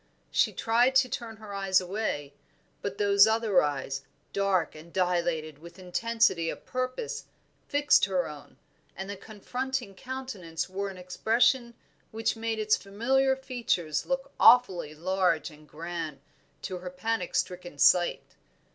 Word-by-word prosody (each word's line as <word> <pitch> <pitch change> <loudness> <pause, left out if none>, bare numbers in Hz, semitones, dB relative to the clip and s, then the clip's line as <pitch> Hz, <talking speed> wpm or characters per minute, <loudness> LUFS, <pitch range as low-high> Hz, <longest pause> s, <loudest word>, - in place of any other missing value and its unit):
She - - +3
tried 240 +3 +2
to 265 -1 +5
turn 230 -3 -6
her 215 -2 -9
eyes 195 -1 +3
away, 180 -7 -3 0.5
but 200 0 -4
those 200 0 +6
other 220 -4 +3
eyes, 135 -2 -2 0.3
dark 195 -4 +1
and 155 +2 -13
dilated 170 -5 0
with 170 +2 -13
intensity 185 -2 +1
of - - -7
purpose, 255 - -3 0.4
fixed 290 0 +4
her 185 -2 0
own, 150 -1 -11 0.4
and 190 - -5
the 200 - -5
confronting 220 +3 -4
countenance 205 -8 -5
wore 195 +2 -3
an 190 - -9
expression 235 +6 +1 0.3
which 225 +2 -1
made 225 0 -2
its 215 0 +3
familiar 265 +7 +1
features 230 - -2
look 270 +1 -2
awfully 190 -11 +5
large 180 -1 0
and 150 0 -17
grand 160 -2 -5 0.4
to 185 -2 -4
her 180 0 -6
panic 185 +1 -2
stricken 175 -4 -2
sight. 175 +4 +4
195 Hz, 140 wpm, -28 LUFS, 175-230 Hz, 0.5 s, those